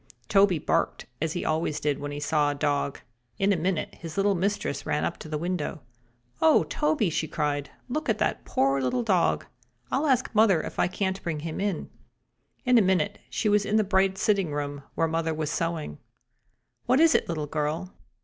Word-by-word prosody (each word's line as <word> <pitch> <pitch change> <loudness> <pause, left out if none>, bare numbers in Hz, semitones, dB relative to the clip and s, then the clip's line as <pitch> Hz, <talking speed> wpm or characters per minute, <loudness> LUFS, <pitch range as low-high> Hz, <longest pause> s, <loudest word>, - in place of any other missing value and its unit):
Toby 195 -3 +5
barked, - - 0 0.2
as 160 0 0
he 175 - -3
always 155 -1 0
did 145 -2 0
when 145 - -4
he 145 - -5
saw 145 0 +2
a 145 - -2
dog. 145 -1 -1 0.4
In 200 +1 +3
a - - +2
minute 175 0 -1
his 165 0 -9
little 200 +1 +3
mistress 195 -4 -1
ran 150 - 0
up - - -3
to 155 - -10
the 155 - -2
window. 170 -2 -3 0.6
"Oh, 320 -1 +6
Toby!" 295 - 0
she 155 - -1
cried. 145 -1 -2 0.2
"Look 300 +2 -3
at 220 - +2
the - - +1
poor 135 +1 +1
little 130 - 0
dog. 190 -6 +2 0.5
I'll 285 +4 +1
ask 260 -3 +1
mother 210 -7 +4
if - - -7
I - - +4
can't 190 +1 -2
bring 155 -3 -3
him 160 0 -4
in." 200 -4 -2 0.7
In 250 -1 +6
a - - +5
minute 190 +1 +1
she 220 - -1
was 205 0 +4
in 205 - -1
the 215 - +4
bright 190 -1 +2
sitting 195 -7 +1
room, 145 -1 -3
where 165 - +2
mother 165 0 -1
was 155 -1 -2
sewing. 165 - -2 0.9
"What 255 +3 +4
is 325 0 +6
it, - - +1
little 155 -3 -2
girl?" 155 +5 -2
170 Hz, 195 wpm, -27 LUFS, 150-205 Hz, 0.9 s, Oh